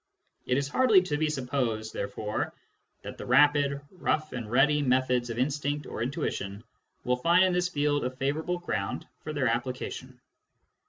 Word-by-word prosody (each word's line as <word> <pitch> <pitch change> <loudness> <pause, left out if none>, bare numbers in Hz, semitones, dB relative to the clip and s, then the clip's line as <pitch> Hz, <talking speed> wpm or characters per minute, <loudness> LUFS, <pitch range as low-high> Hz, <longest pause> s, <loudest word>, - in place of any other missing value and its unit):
It 125 - +2
is 140 0 0
hardly 215 - +5
to 155 -5 -2
be 155 0 +1
supposed, 125 -6 -2
therefore, 105 +1 -3 0.5
that - - -8
the - - -6
rapid, 140 +1 +4
rough 155 -4 -1
and 115 -4 -5
ready 145 +5 +4
methods 125 -2 +1
of 115 - -4
instinct 145 +2 -1
or - - -6
intuition 115 -6 -3 0.4
will 125 0 +1
find 170 +7 +4
in 185 -1 +3
this 180 0 +1
field 145 -3 +1
a 125 - 0
favourable 145 +7 -2
ground 100 - -3
for 155 - -6
their 140 -4 0
application. 125 +1 -3
140 Hz, 160 wpm, -28 LUFS, 125-150 Hz, 0.5 s, hardly